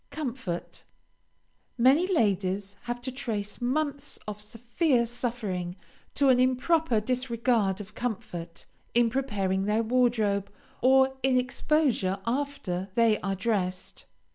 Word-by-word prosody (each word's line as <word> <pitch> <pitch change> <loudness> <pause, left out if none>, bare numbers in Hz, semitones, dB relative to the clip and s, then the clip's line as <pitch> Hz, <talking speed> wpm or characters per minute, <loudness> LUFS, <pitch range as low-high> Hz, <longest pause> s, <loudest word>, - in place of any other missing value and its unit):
COMFORT 255 - -5 0.9
Many 270 +9 +5
ladies 200 - 0
have 240 0 -4
to 260 - -3
trace 225 -6 -4
months 285 +3 -1
of 210 0 -5
severe 240 +4 0
suffering 225 -7 -3 0.4
to 280 -1 +4
an 250 -1 +5
improper 255 +1 +2
disregard 235 -4 0
of 205 0 -9
comfort, 210 -8 -5 0.3
in 235 -1 +4
preparing 195 -7 0
their 215 +2 +1
wardrobe, 220 -5 +1 0.3
or 265 +1 +5
in 260 -1 +3
exposure 250 -6 +1
after 230 -8 -2
they 230 -2 +4
are 195 0 -2
dressed. 185 -3 -2
235 Hz, 115 wpm, -28 LUFS, 200-260 Hz, 0.9 s, Many